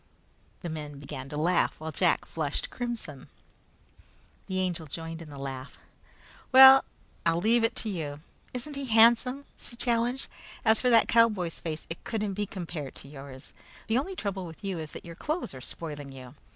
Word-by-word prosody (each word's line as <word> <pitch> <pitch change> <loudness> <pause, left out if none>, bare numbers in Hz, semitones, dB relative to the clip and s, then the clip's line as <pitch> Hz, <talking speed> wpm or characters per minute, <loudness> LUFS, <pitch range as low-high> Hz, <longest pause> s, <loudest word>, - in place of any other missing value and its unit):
The 175 - -3
men 150 -2 -6
began 135 -1 -7
to 150 - -5
laugh 175 +3 +2
while 160 0 -5
Jack 175 +3 +2
flushed 150 -3 -3
crimson. 230 - -5 1.2
The 190 0 -1
Angel 175 -4 -1
joined 165 +2 -6
in 160 - -10
the 145 - -9
laugh. 135 -1 -6 0.7
"Well, 265 +1 +10 0.4
I'll 165 0 +3
leave 225 +5 +3
it 225 +1 +2
to - - -1
you! 150 -7 -4 0.3
Isn't 260 +4 -5
he 280 0 -4
handsome?" 240 +4 +5
she 235 - -11
challenged. 240 +2 0 0.4
"As 220 0 +5
for 250 - +3
that 230 -2 +6
cowboy's 210 -8 +3
face, 160 -2 -5
it 165 - -7
couldn't 215 -3 -2
be 205 +1 -2
compared 170 -8 -6
with - - -12
yours. 135 -1 -10 0.3
The 230 +2 +2
only 375 +8 -4
trouble 195 - -3
with 165 +3 -12
you 190 -4 -2
is 155 -1 -6
that - - -8
your 170 - -8
clothes 305 - -3
are 130 - -9
spoiling 145 -1 -5
you. 130 -2 -10
175 Hz, 180 wpm, -29 LUFS, 150-230 Hz, 1.2 s, Well